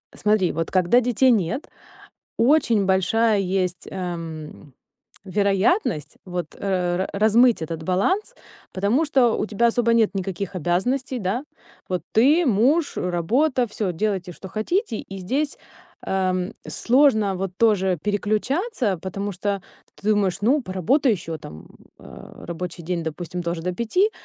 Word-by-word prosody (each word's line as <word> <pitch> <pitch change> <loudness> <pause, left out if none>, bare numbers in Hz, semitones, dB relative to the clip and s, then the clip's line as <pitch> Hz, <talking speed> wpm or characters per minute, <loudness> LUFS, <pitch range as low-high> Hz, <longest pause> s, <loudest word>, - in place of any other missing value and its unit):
Смотри, 210 -4 +2
вот 165 0 -3
когда 185 +6 +4
детей 250 +1 +3
нет, 225 - 0 0.7
очень 230 -6 +3
большая 210 +3 +2
есть, 185 -2 -1
эм, 165 -5 -6 0.5
вероятность 200 - 0
вот 180 -3 -5
раз 185 -1 0
размыть 220 +2 +4
этот 160 0 -5
баланс, 365 - 0 0.4
потому 210 +11 +1
что 260 -6 +3
у - - 0
тебя 220 +2 +1
особо 235 0 +2
нет 225 -3 +3
никаких 195 0 -4
обязанностей, 245 - -1
да? 220 +8 -2 0.4
Вот, 180 -2 -1
ты, 290 +9 +4
муж, 260 +9 +2
работа, 240 - +1
всё 205 -3 -3
делайте, 190 -1 -2
что 190 - -10
хотите. 225 - -1
И 195 0 -8
здесь, 275 +11 -2 0.4
а, 190 -1 0 0.3
сложно 235 -6 +3
вот 190 0 -3
тоже 190 -6 +3
переключаться, 215 - 0
потому 195 +4 -4
что 195 +1 -2 0.3
ты 210 - -5
думаешь: 205 -4 +2
"Ну, 260 +6 +2
поработай 225 - +1
ещё 165 -4 -4
там". 75 - -11 0.3
А. - - -12
Рабочий 175 0 -6
день, 170 0 -2
допустим, 175 +2 -5
тоже 170 -1 -3
до 180 +2 -2
5. 365 - +1
200 Hz, 135 wpm, -23 LUFS, 180-240 Hz, 0.7 s, когда